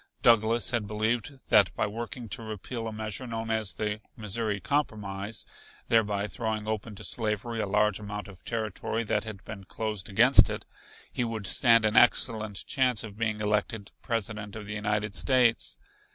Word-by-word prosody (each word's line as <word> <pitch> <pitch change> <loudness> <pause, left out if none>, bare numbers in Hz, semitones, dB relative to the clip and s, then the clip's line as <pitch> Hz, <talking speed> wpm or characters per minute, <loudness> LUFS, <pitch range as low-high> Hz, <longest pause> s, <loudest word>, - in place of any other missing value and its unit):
Douglas 115 +1 +4
had 115 -4 0
believed 110 +6 -1
that 100 -3 +5
by - - +1
working 115 +2 -5
to 100 - -3
repeal 115 +2 -5
a - - -4
measure 110 +3 -5
known 115 -1 -3
as 110 -3 0
the 105 0 -2 0.2
Missouri 105 -1 -2
Compromise, 105 -7 -2 0.4
thereby 105 -3 +2
throwing 110 +1 -3
open 110 0 -3
to - - -9
slavery 115 0 -2
a 105 - -1
large 105 0 +2
amount 105 0 -6
of 95 -3 -13
territory 110 0 -2
that 110 - -1
had 105 -3 -8
been 105 -3 -8
closed 105 -1 -4
against 120 +7 +6
it, - - -5 0.5
he - - 0
would 115 -3 -4
stand 115 0 +5
an 110 0 +1
excellent 110 -4 +3
chance 125 -5 +1
of 105 -3 -8
being 110 -2 -1
elected 105 0 -1
President 110 -3 -3
of 105 -1 -7
the 105 - -5
United 105 0 -1
States. 125 -2 +3
110 Hz, 165 wpm, -28 LUFS, 105-115 Hz, 0.5 s, against